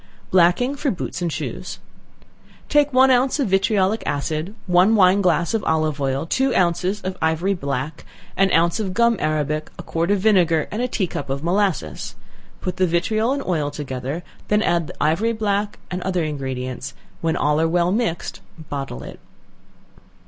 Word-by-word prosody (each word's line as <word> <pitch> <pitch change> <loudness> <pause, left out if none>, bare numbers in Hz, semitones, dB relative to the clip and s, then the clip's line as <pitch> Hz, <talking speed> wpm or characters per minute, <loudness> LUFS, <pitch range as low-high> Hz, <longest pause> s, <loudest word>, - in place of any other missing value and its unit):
Blacking 185 +9 +4
for 280 0 -1
Boots 185 -3 -4
and 170 -2 -1
Shoes. 150 +3 -5 0.9
Take 290 -1 +3
one 260 +1 +5
ounce 255 +4 +2
of 265 - +1
vitriolic 195 +2 +2
acid, 155 +7 -2
one 185 +4 +4
wine 190 0 +5
glass 170 -1 +2
of 220 -3 0
olive 155 -2 0
oil, 135 +2 0
two 265 +10 +1
ounces 180 +3 +1
of 185 0 -4
ivory 160 +5 +1
black, 140 -2 -4 0.3
an 195 -1 +3
ounce 170 +4 +3
of 190 -4 -3
gum 235 +1 +4
arabic, 155 0 -1
a - - -7
quart 165 +2 -1
of 205 -1 +3
vinegar, 180 -6 +3
and 215 - -2
a 250 - +1
tea 220 -5 -1
cup 145 -5 -5
of 140 +2 -3
molasses; 175 - -1 0.5
put 180 -1 -3
the 185 - +3
vitriol 215 +8 +1
and 275 0 -1
oil 155 -5 0
together, 140 +2 -5 0.2
then 210 +1 +2
add 170 -2 +1
the - - -9
ivory 195 +10 +1
black 205 -1 -1
and 180 0 -3
other 180 -2 0
ingredients; 130 -3 -4 0.3
when 165 -1 0
all 150 +1 +2
are 165 - +3
well 175 +1 +2
mixed, 210 -6 -2 0.3
bottle 135 - -4
it. - - -10
175 Hz, 170 wpm, -22 LUFS, 155-205 Hz, 0.9 s, one